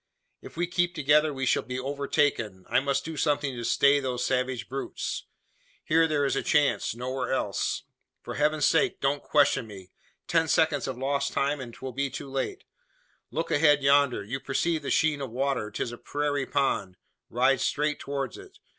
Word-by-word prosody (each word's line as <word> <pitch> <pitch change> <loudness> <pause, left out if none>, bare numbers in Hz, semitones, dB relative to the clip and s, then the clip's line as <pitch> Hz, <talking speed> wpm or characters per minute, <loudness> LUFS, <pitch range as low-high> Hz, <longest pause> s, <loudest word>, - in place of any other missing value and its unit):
"If - - -12
we 175 - +1
keep 175 0 0
together 150 +1 +3
we 135 -2 -3
shall - - +2
be 125 0 -5
overtaken. 135 -8 -1
I - - +3
must 140 0 -1
do 160 0 -5
something 145 -2 0
to 120 - -5
stay 140 +4 +4
those 125 -2 -2
savage 125 -1 -1
brutes. 135 +1 -4 0.6
Here 165 +1 +3
there 150 -2 +1
is 135 - 0
a - - 0
chance 145 -5 +1
nowhere 130 +2 -3
else. 105 -7 -1 0.4
For - - -6
heaven's 150 0 +2
sake 195 -2 +2
don't 140 +1 0
question 145 -5 +2
me! 95 -3 -11 0.4
Ten - - +2
seconds - - +2
of - - -4
lost 140 +2 -1
time, 140 +1 0
and 125 -3 -7
'twill 130 +3 -7
be 140 +2 -1
too 135 - -7
late. 135 -1 -3 0.7
Look 160 +6 -3
ahead 145 -1 +4
yonder. 140 -5 +4
You 125 +6 -4
perceive 160 +4 -1
the - - -4
sheen 155 -3 +2
of 135 - -4
water. 130 -2 -1
'Tis 115 - -3
a 120 - -9
prairie 145 -1 -2
pond. 100 -10 0 0.3
Ride 130 +2 +2
straight 150 +2 0
towards 140 - -4
it. 395 0 -14
140 Hz, 180 wpm, -27 LUFS, 130-150 Hz, 0.7 s, stay